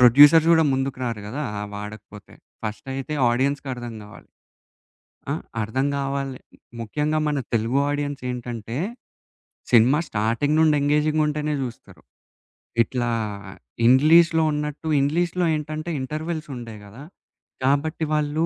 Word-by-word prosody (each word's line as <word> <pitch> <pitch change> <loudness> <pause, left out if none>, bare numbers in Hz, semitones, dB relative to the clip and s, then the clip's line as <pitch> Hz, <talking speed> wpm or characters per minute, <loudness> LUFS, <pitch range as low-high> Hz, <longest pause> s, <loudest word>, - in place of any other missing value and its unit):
Producers 145 +6 +8
గూడా 160 -1 +5
ముందుకు‌రారు 130 -5 -3
గదా! 145 +7 -4 0.2
అవాడకపోతే. 105 0 -9 0.3
ఫస్టయితే 135 +7 -4 0.2
ఆడియన్స్‌కి 135 +3 0
అర్థం 120 -1 -7
గావాలి. 105 - -13 1.1
ఆ? - - +1 0.3
అర్థం 130 +6 -1
గావాలే, 135 -1 -3 0.4
ముఖ్యంగా 150 +7 -1
మన 150 -1 0 0.2
తెలుగు 115 +3 +1
ఆడియన్స్ 145 -1 -3
ఏంటంటే, 120 -2 -5 0.9
సినిమా 125 +5 +5
స్టార్టింగ్ 115 +8 0
నుండి 155 -2 +5
ఎంగేజింగ్‌గా 150 +2 +2
ఉంటేనే 150 0 -1
జూస్తారు. 120 -3 -8 0.8
ఇట్లా 120 -1 -2 0.8
ఇంగ్లీష్‌లో 160 +5 +6
ఉన్నట్టు 150 +1 -4
ఇంగ్లీష్‌లో 175 +5 +1
ఏంటంటే, 155 +2 -4
ఇంటర్వల్స్ 155 +3 -4
ఉండయి 115 -3 -8
గదా! 115 +8 -12 0.6
కాబట్టి, 145 +4 +1
వాళ్ళు 150 +1 +1
140 Hz, 105 wpm, -23 LUFS, 120-150 Hz, 1.1 s, Producers